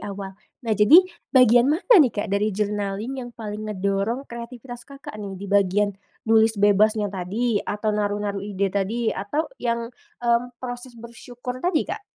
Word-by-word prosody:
awal 195 -1 -6 0.3
nah 225 - 0
jadi 210 - +8 0.3
bagian 245 -3 +6
mana 335 +11 +2
nih 275 - +5
Kak 205 0 -3
dari 205 +1 +1
journaling 205 +3 -2
yang 245 -1 -7
paling 215 -1 -6
ngedorong 200 +5 -1
kreativitas 235 0 -9
Kakak 275 -1 -10
nih 200 -2 -6
di 200 - -6
bagian, 200 +1 +2 0.4
nulis 220 -1 +4
bebasnya 205 +1 +3
tadi 205 +5 -1
atau 210 +1 -3
naruh-naruh 205 -1 -2
ide 200 -1 -1
tadi 220 +4 -1
atau 205 +12 -2 0.2
yang, 235 -1 -1 0.4
mmm, 235 0 +3 0.2
proses 245 0 -7
bersyukur 245 +2 -8
tadi, 350 -1 +1
Kak? - - -4
215 Hz, 155 wpm, -23 LUFS, 205-240 Hz, 0.4 s, jadi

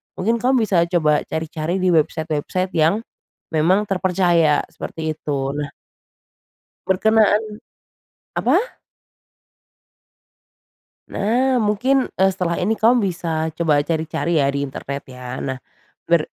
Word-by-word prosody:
mungkin 225 +5 0
kamu 255 -1 +3
bisa 185 -5 +3
coba 155 -4 +2
cari-cari 160 +1 -3
di 185 - +3
website-website 160 +4 0
yang, 160 +4 +4 0.6
memang 185 +7 +2
terpercaya 175 -5 +2
seperti 160 -1 -5
itu 140 -2 -3
nah. 145 -1 -4 1.2
Berkenaan 215 +2 +3 1.0
apa? - - +1 2.3
Nah, 250 +5 +1
mungkin, 245 +5 +2
eee, 190 +1 +3
setelah 180 -2 -2
ini 220 +4 0
kamu 235 +1 +4
bisa 160 -2 -2
coba 150 -4 +3
cari-cari 160 0 -1
ya 140 - +3
di 140 - -1
internet 140 0 -5
ya. 125 0 -7
Nah, 130 -1 -3 0.5
ber - - +3
170 Hz, 110 wpm, -20 LUFS, 155-205 Hz, 2.3 s, yang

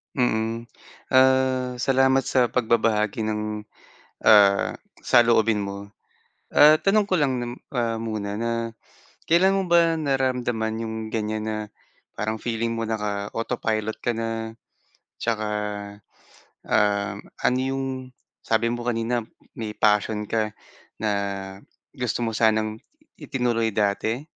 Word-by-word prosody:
Mm, 115 -2 0 0.4
ah, 130 -1 +3
salamat 135 0 +3
sa 130 -2 +2
pagbabahagi 110 -2 +1
ng, 105 0 -3 0.6
ah, 100 -2 +6 0.3
saloobin 115 -3 +4
mo. 100 0 -6 0.6
Ah, 155 +1 +6
tanong 205 +1 +3
ko 185 -4 0
lang 135 -3 +1
nam 120 -1 -3 0.2
ah, 115 -2 0
muna 105 -2 -3
na 115 0 -2 0.5
kailan 190 +4 +4
mo 195 - 0
ba 170 -1 +4
naramdaman 125 -6 -1
'yong 110 0 -4
ganyan, 110 -1 -2
na 110 - -2 0.6
parang 110 +1 -2
feeling 115 0 -2
mo 115 - -2
naka-autopilot 110 +1 -2
ka 120 - -1
na 115 0 -3 0.7
tsaka, 110 -2 -1 1.2
ah, 100 -1 +1 0.3
ano 125 +1 +3
yung, 135 +1 -1 0.6
sabi 115 +1 +1
mo 120 0 -4
kanina, 120 +1 0 0.4
may 110 -2 -5
passion 105 0 +2
ka 110 -1 0 0.5
na 110 -1 0 0.8
gusto 125 -2 -2
mo 115 - -1
sanang 110 -1 +1 0.4
itinuloy 125 -6 0
dati? 110 +5 0
115 Hz, 115 wpm, -24 LUFS, 110-125 Hz, 1.2 s, ah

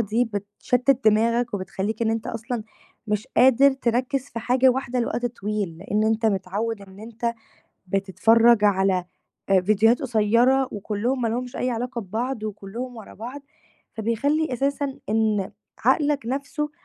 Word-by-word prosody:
دي 230 +3 +1
بتشتِّت 230 +5 0
دماغك 230 +2 +3
وبتخلّيك 200 +3 -3
إن 225 - +2
أنت 225 0 -2
أصلًا 230 +1 -4 0.4
مش 210 +2 -1
قادر 265 +2 +6
تركِّز 255 +1 0
في 230 - -6
حاجة 250 +3 +3
واحدة 255 -1 0
لوقت 240 +1 -1
طويل، 210 -7 -4
لأن 195 +2 -4
إن - - +2
أنت 220 +1 +1
متعوّد 205 +2 -2
إن 195 0 -14
أنت 235 +1 -3 0.5
بتتفرّج 210 +4 +4
على 190 -2 +2 0.4
آآ 195 -1 +5
فيديوهات 215 +5 +3
قصيّرة 245 +2 +3
وكلّهم 215 +5 -2
ما 230 - +1
لهُمش 245 +2 -3
أي 255 - -1
علاقة 240 +1 -3
ببعض 225 +4 -3
وكلّهم 215 +4 -6
ورا 220 - -11
بعض، 245 +7 -7 0.5
فبيخلّي 265 +8 0
أساساً 275 +2 -1
إن 215 -2 +1 0.3
عقلك 290 -5 +2
نفسُه 285 +4 -3
230 Hz, 140 wpm, -24 LUFS, 210-250 Hz, 0.5 s, قادر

